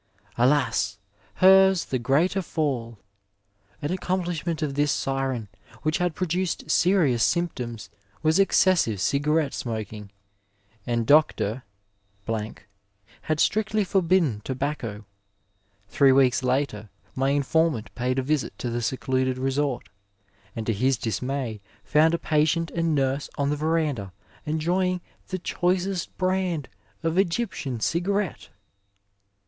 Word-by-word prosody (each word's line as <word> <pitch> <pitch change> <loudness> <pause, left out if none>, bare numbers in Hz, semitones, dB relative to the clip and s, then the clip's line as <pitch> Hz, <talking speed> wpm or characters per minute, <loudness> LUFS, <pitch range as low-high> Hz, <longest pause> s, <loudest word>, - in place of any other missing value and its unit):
Alas! 125 -6 +2 0.4
hers 190 -1 +6
the 130 - -2
greater 155 +11 +2
fall! 130 - -2 0.9
An 145 - -1
accomplishment 175 -3 -2
of 145 -2 -2
this 145 0 +1
siren, 135 -4 -2 0.4
which 155 +4 0
had 180 -2 0
produced 185 0 -2
serious 170 -11 +3
symptoms, 120 - -2 0.3
was 160 +4 +3
excessive 185 - +3
cigarette 145 - +1
smoking, 110 -3 -5 0.8
and 120 -1 0
Dr. 130 -5 +3 1.6
had 155 -1 -1
strictly 215 +2 +2
forbidden 180 - +2
tobacco. 130 -6 -4 0.8
Three 135 +2 +4
weeks 130 0 +4
later, 125 -5 -1 0.2
my 135 +1 0
informant 145 -3 +1
paid 125 +1 -1
a 130 - +1
visit 150 +1 -1
to 120 - -3
the 120 +1 -2
secluded 130 +2 -1
resort, 135 0 -1 0.7
and 110 - -4
to 115 - +1
his 130 +5 +1
dismay 115 0 -3 0.3
foimd 160 +4 +3
patient 160 +2 +1
and 165 -2 0
nurse 135 +1 0
on 140 0 0
the - - +1
verandah 150 - -1 0.3
enjoying 180 +4 0 0.3
the 185 - -3
choicest 180 +1 -1
brand 185 -5 -1 0.3
of 165 +3 +1
Egyptian 175 - -1
cigarette 185 - -1
145 Hz, 110 wpm, -25 LUFS, 125-175 Hz, 1.6 s, hers